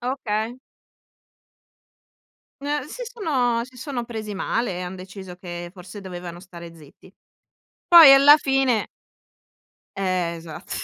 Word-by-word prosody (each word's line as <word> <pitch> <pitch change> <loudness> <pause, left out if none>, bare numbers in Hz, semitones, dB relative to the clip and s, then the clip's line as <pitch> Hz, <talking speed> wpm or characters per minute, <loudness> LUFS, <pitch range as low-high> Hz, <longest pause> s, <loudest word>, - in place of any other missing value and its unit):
Okay. 240 -2 -3 2.1
N 290 0 -2
si - - -8
sono 260 - -1
si 255 0 -17
sono 250 -2 -5
presi 220 -3 -6
male, 195 0 -2
e 180 - -5
han 180 +1 -6
deciso 190 0 -10
che 175 -1 -8
forse 190 +2 -11
dovevano 175 -2 -8
stare 170 -2 -12
zitti. 160 +4 -18 0.8
Poi, 330 -5 +10
alla 280 +2 +8
fine 270 -6 +1 1.1
Eh, 185 -3 -1
esatt 165 -1 -11
210 Hz, 115 wpm, -23 LUFS, 180-265 Hz, 2.1 s, Poi